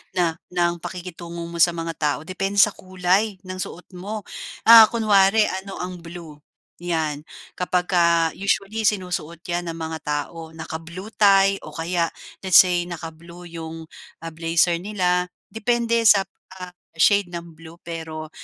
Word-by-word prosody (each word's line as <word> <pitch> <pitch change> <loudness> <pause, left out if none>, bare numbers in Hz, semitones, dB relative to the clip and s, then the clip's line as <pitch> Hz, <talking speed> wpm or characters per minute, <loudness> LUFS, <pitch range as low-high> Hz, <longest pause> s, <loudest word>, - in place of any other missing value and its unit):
na 170 -2 0
ng 175 -1 0
pakikitungo 170 -1 -7
mo 170 0 -7
sa 170 +1 +4
mga 165 0 -4
tao, 150 -2 0
depende 195 +3 -3
sa 205 +1 +6
kulay 185 +3 0
ng 185 0 -7
suot 180 -1 -7
mo. 210 +3 -5 0.4
Ah, 225 -1 +10
kunwari 210 -2 +4 0.2
ano 195 0 -9
ang 180 0 -6
blue, 165 -3 -10 0.4
'yan. 160 -3 -2 0.2
Kapagka 175 -2 +2
usually 200 +2 -1
sinusuot 180 -5 -2
'yan 175 0 -3
ng 165 - -4
mga 160 0 -5
tao, 160 +2 -4
naka-blue 165 +5 -8
tie 195 -2 +4
o - - -11
kaya 170 +1 0 0.3
let's 190 -2 +7
say 175 -1 -1
naka-blue 170 +1 -9 0.2
yung, 160 0 -7 0.4
ah, 165 - -5
blazer 165 +1 +1
nila 180 -2 0 0.2
depende 235 +1 +1
sa, 200 -2 +6 0.3
ah, 180 -1 -8 0.3
shade 200 +3 +4
ng 170 -1 -7
blue, 165 0 -12
pero, 160 -2 -6
175 Hz, 145 wpm, -22 LUFS, 165-195 Hz, 0.4 s, Ah